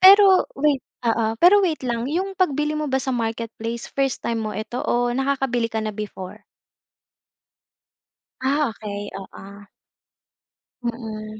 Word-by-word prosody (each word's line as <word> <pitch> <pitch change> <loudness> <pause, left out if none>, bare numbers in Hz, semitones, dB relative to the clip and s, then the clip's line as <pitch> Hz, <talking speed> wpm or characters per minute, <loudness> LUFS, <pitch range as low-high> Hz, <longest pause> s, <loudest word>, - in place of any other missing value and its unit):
Pero 385 0 +8
wait 285 -1 +2 0.2
oo 225 -1 +2
pero 390 +4 +8
wait 320 -4 0
lang 235 -1 -1
'yung 375 +5 -1
pagbili 300 -4 +1
mo 305 - -1
ba 265 - +1
sa 265 - -5
marketplace 230 0 -3
first 270 -2 0
time 230 -1 0
mo 215 - -3
ito 220 +3 -5
o 245 0 +2
nakakabili 265 -3 0
ka 220 0 -2
na 215 0 -3
before? 200 -3 -7 2.0
Ah, 280 +2 +2
okey 205 -1 -6
oo. 195 - -8 1.6
Mm. 215 -2 -5
240 Hz, 130 wpm, -23 LUFS, 220-290 Hz, 2.0 s, Pero